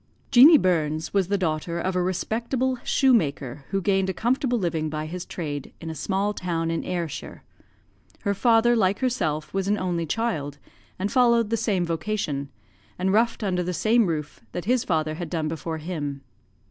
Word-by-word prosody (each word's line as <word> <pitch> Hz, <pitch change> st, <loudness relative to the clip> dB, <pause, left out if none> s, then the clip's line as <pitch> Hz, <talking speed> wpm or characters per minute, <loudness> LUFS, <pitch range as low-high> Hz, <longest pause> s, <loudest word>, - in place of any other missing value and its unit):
"Jeanie 290 Hz, +6 st, +9 dB
Burns 160 Hz, -, 0 dB
was 195 Hz, -3 st, +2 dB
the 200 Hz, +1 st, +1 dB
daughter 170 Hz, -1 st, -2 dB
of 185 Hz, +2 st, -2 dB
a 180 Hz, -, +2 dB
respectable 235 Hz, +8 st, -1 dB
shoemaker, 145 Hz, -, +1 dB
who 195 Hz, -, 0 dB
gained 190 Hz, -1 st, +2 dB
a 190 Hz, -, -2 dB
comfortable 245 Hz, +1 st, +1 dB
living 165 Hz, -6 st, -1 dB
by 155 Hz, 0 st, -3 dB
his 175 Hz, +3 st, -6 dB
trade 145 Hz, -5 st, -5 dB
in 165 Hz, -1 st, -6 dB
a -, -, -5 dB
small 195 Hz, +6 st, -1 dB
town 165 Hz, -4 st, -2 dB
in 165 Hz, -, -2 dB
Ayrshire. 170 Hz, -4 st, -5 dB, 0.8 s
Her 200 Hz, -, 0 dB
father, 235 Hz, +2 st, +4 dB
like 200 Hz, -3 st, +2 dB
herself, 155 Hz, -, -1 dB
was 195 Hz, 0 st, -1 dB
an 205 Hz, +1 st, +2 dB
only 175 Hz, -3 st, -2 dB
child, 150 Hz, -9 st, -2 dB, 0.4 s
and 195 Hz, +2 st, -2 dB
followed 235 Hz, -4 st, +3 dB
the -, -, +3 dB
same 205 Hz, -5 st, 0 dB
vocation, 160 Hz, -5 st, -2 dB, 0.5 s
and 190 Hz, +1 st, 0 dB
wrought 230 Hz, +1 st, +2 dB
under 180 Hz, -3 st, 0 dB
the 180 Hz, 0 st, -2 dB
same 225 Hz, +2 st, +3 dB
roof 150 Hz, -3 st, -4 dB
that 175 Hz, -, -4 dB
his 250 Hz, +2 st, +2 dB
father 155 Hz, -3 st, 0 dB
had 165 Hz, 0 st, -5 dB
done 160 Hz, -2 st, -1 dB
before 160 Hz, +1 st, -4 dB
him. 150 Hz, -4 st, -4 dB
180 Hz, 175 wpm, -25 LUFS, 160-220 Hz, 0.8 s, Jeanie